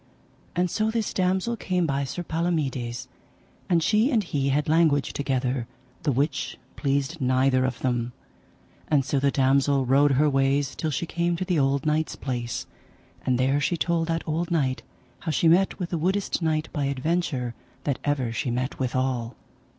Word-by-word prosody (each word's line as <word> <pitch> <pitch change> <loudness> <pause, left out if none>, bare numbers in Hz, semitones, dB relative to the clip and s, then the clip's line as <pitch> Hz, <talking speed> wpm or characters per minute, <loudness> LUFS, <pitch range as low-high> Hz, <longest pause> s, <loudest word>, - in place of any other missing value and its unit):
And 180 0 +2
so 215 0 +1
this 220 -1 -1
damosel 190 +5 +1
came 180 -4 0
by 140 -2 0
Sir 175 +7 -4
Palomides, 150 -9 -2 0.6
and 170 -3 +3
she 215 - +3
and 230 -7 +2
he 140 -6 -1
had 145 +2 +1
language 155 -3 +3
together, 130 -3 -1 0.3
the 150 - +1
which 140 +3 -1 0.2
pleased 140 +3 -1
neither 130 0 +3
of 130 -2 -2
them; 120 -2 0 0.8
and 140 -4 +2
so 135 +1 +1
the 140 +1 +3
damosel 135 0 +3
rode 140 +2 +4
her 145 +3 +4
ways 135 0 +1
till 160 - -2
she 155 +3 -2
came 170 +1 0
to 185 - -3
the 180 -4 +1
old 140 +2 +1
knight's 155 +1 +1
place, 120 -3 -3 0.6
and 125 -1 +3
there 135 +3 +2
she 170 +4 +1
told 165 0 0
that 165 0 -2
old 165 +2 -1
knight 140 -6 0 0.4
how 170 - -5
she 160 +2 +2
met 180 +4 +4
with 180 -2 -4
the 170 - -1
woodest 190 +3 0
knight 155 -1 0
by 145 -2 0
adventure 140 -2 -1 0.3
that 140 -3 -1
ever 135 -5 0
she 125 +3 -2
met 125 +3 -2
withal. 130 -2 -1
145 Hz, 175 wpm, -25 LUFS, 130-170 Hz, 0.8 s, rode